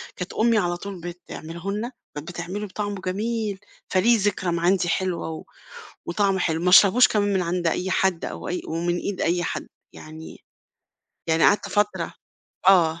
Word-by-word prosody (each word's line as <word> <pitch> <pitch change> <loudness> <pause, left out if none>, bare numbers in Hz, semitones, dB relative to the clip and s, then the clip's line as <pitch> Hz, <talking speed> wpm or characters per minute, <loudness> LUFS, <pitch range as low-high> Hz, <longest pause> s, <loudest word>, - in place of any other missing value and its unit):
كانت 180 - -6
أمي 230 0 +3
على 175 -3 0
طول 195 -2 -7
بتعمله 170 +1 -7
لنا، 225 +5 -3 0.3
بتعمله 175 +6 -5
بطعمه 205 0 -4
جميل، 210 +1 -2 0.3
فليه 225 +5 +4
ذكرى 190 -3 0
ما 170 0 -1
عندي 175 0 +2
حلوة، 180 -2 -1
و 160 - -6 0.6
وطعمه 195 +1 +1
حلو، 165 -1 0
ما 180 - +2
أشربوش 200 +6 +7
كمان 205 -1 +1
من 190 - +2
عند 175 0 -1
أي 185 +3 -1
حد، 185 -3 +1
أو - - -6
أي 180 - -2
ومن 175 +2 -1
إيد 200 0 -3
أي 175 +1 +1
حد، - - -4 0.3
يعني 155 +1 -11 0.8
يعني 160 0 +3
قعدت 205 - +3
فترة 210 0 0 0.5
آه. 170 -3 +5
185 Hz, 160 wpm, -24 LUFS, 170-205 Hz, 0.8 s, أشربوش